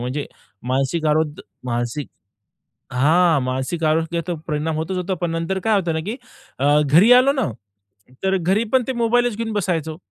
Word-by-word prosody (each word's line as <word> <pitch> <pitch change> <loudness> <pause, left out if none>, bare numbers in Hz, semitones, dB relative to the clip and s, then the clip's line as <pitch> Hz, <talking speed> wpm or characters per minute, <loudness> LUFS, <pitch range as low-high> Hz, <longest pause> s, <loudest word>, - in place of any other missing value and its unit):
म्हणजे 130 +4 -3 0.4
मानसिक 135 +5 0
आरोग 150 0 0 0.2
मानसिक 120 +3 -3 0.8
हां, 160 +4 +3
मानसिक 130 +6 -2
आरोग्याचा 165 +2 0
परिणाम 155 +1 -1
होतोच 165 +4 -3
होतो. 185 +1 -2
पण 175 - -1
नंतर 165 +3 -2
काय 220 -1 +3
होतं 170 -3 -1
ना, 160 - -1
की 225 +4 -3 0.4
अ, 145 +3 +3
घरी 170 - +6
आलो 255 +3 +6
ना, 265 -6 0 0.8
तर 190 0 +2
घरीपण 215 +8 +1
ते - - +1
मोबाईलच 240 -1 +1
घेऊन 225 0 -3
बसायचो. 165 -6 -2
165 Hz, 155 wpm, -21 LUFS, 150-200 Hz, 0.8 s, घरी